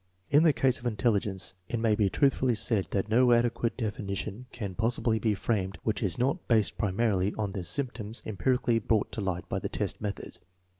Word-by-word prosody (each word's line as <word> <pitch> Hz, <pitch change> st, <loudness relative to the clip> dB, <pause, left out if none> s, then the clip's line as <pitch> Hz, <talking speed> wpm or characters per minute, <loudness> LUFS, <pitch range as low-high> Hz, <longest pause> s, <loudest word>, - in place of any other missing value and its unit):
In 145 Hz, +1 st, +6 dB
the 165 Hz, -1 st, +6 dB
case 130 Hz, 0 st, +2 dB
of 120 Hz, -, -3 dB
in 115 Hz, -, -1 dB
telligence 100 Hz, -4 st, 0 dB, 0.2 s
it 120 Hz, -, -1 dB
may 115 Hz, -1 st, +2 dB
be 105 Hz, -2 st, +2 dB
truthfully 130 Hz, 0 st, +2 dB
said 105 Hz, -2 st, +2 dB
that 100 Hz, 0 st, -1 dB
no 120 Hz, +3 st, +4 dB
adequate 120 Hz, 0 st, +1 dB
defi 110 Hz, -4 st, -3 dB
nition 100 Hz, +4 st, -5 dB
can 100 Hz, -5 st, -5 dB
possibly 115 Hz, +1 st, 0 dB
be 110 Hz, -1 st, +1 dB
framed 100 Hz, -2 st, -1 dB
which 110 Hz, +1 st, -1 dB
is 95 Hz, -7 st, 0 dB
not 135 Hz, +8 st, -1 dB
based 110 Hz, -4 st, +2 dB
primarily 100 Hz, -1 st, 0 dB
on 105 Hz, -2 st, -1 dB
tho 95 Hz, -1 st, -4 dB
symptoms 110 Hz, +3 st, -3 dB
empirically 120 Hz, +2 st, +1 dB
brought 110 Hz, -1 st, 0 dB
to 110 Hz, -, -4 dB
light 90 Hz, -2 st, -3 dB
by -, -, -2 dB
the -, -, -4 dB
test -, -, -3 dB
method. 105 Hz, -1 st, -5 dB
110 Hz, 200 wpm, -29 LUFS, 100-120 Hz, 0.2 s, In